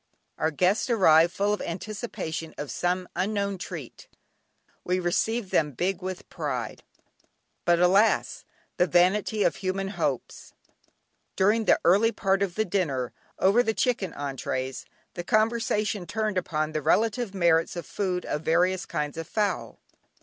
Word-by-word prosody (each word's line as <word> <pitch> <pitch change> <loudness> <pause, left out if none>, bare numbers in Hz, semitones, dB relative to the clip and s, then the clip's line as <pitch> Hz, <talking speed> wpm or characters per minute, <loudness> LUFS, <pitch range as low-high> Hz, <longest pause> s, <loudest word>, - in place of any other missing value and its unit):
Our 160 - +2
guests 185 - +1
arrived 170 -7 +5
full 205 +2 0
of 210 - -3
anticipation 170 -4 -5
of 145 - -5
some 180 +1 -1
unknown 200 0 -1
treat; 165 -9 -8 0.8
we 180 +1 0
received 195 +4 -1
them 150 -2 +1
"big 185 +7 -1
with 185 0 -6
pride." - - -4 0.8
But 175 -1 +4
alas! 190 +5 +3 0.3
the 180 - +3
vanity 190 +5 +2
of - - +1
human 195 0 -2
hopes. 155 - -3 0.8
During 215 +4 +2
the - - +4
early 205 +6 +5
part 195 -3 0
of 190 -3 -1
the 220 - +1
dinner, 145 - -1 0.2
over 200 +6 +4
the 220 -3 -1
chicken 235 -7 0
entrées, 135 -2 -4 0.3
the 175 - -5
conversation 215 -2 0
turned 215 -1 -1
upon 155 -3 -2
the 155 -1 -2
relative 220 - +1
merits 170 -2 +2
as 170 - -5
food 180 -1 -2
of 150 - -2
various 180 +3 +1
kinds 150 0 -3
of 165 - -6
fowl. 205 +2 -2
185 Hz, 140 wpm, -26 LUFS, 165-210 Hz, 0.8 s, arrived